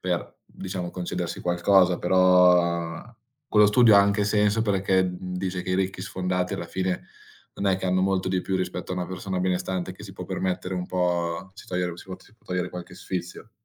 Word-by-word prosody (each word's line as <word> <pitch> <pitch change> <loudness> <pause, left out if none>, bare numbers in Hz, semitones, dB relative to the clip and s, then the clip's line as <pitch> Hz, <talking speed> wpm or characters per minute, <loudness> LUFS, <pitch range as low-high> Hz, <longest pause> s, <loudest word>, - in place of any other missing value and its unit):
per, 90 -2 -3
diciamo, 90 -2 -6
concedersi 90 -1 -4
qualcosa. 90 +1 +3
Però 90 -2 +4 0.5
quello 105 -1 +6
studio 110 +1 +6
ha - - +9
anche 100 +1 +2
senso 105 +1 +2
perché, 95 -2 +2
mhmm, 90 0 -5
dice 90 -1 -3
che - - -5
i - - +2
ricchi 95 0 -1
sfondati 90 0 -2
alla - - -5
fine 95 +1 -2 0.5
non 100 - -3
è 95 - +2
che 95 - -4
hanno 95 0 +2
molto 95 -1 +1
di 95 -1 0
più 95 0 -1
rispetto 90 0 -3
a - - -1
una 90 -1 -3
persona 95 +1 -4
benestante 90 0 -1
che 95 - -12
si 95 - -10
può 90 - -7
permettere 95 0 -2
un 90 0 -3
po' 90 0 -1
si - - -13
togliere 90 -1 -2
si - - -11
può 95 -1 -7
si - - -21
può 115 - -34
togliere 90 -1 -2
qualche 90 0 -8
sfizio. 90 +4 -6
90 Hz, 200 wpm, -25 LUFS, 90-95 Hz, 0.5 s, ha